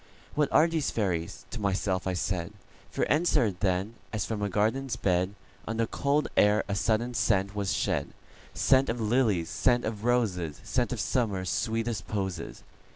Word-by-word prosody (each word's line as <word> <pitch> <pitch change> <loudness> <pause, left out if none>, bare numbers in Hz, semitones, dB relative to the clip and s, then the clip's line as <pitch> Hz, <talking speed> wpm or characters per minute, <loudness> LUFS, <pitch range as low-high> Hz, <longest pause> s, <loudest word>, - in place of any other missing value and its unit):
"What 150 -1 +1
are 155 - +6
these 165 -3 0
fairies?" 90 -6 -2
to 115 - -5
myself 95 -1 0
I 95 - 0
said; 90 +1 -2 0.4
For - - 0
answer, 150 - +3
then, 95 +3 -1 0.2
as 110 -2 -2
from 110 -2 -3
a 100 - 0
garden's 115 +6 0
bed, 95 -1 0 0.3
On 110 +1 -2
the 115 - +2
cold 140 +6 0
air 105 +1 +4
a 100 - -2
sudden 115 +4 0
scent 100 -4 +1
was 100 -2 -1
shed,—Scent 135 0 0
of 115 +1 -1
lilies, 110 -7 +1
scent 120 -1 +2
of 110 -1 -4
roses, 100 -11 0
Scent - - 0
of - - -3
Summer's 100 -7 0
sweetest 115 0 -1
posies. 95 -5 -4
105 Hz, 160 wpm, -28 LUFS, 95-120 Hz, 0.4 s, are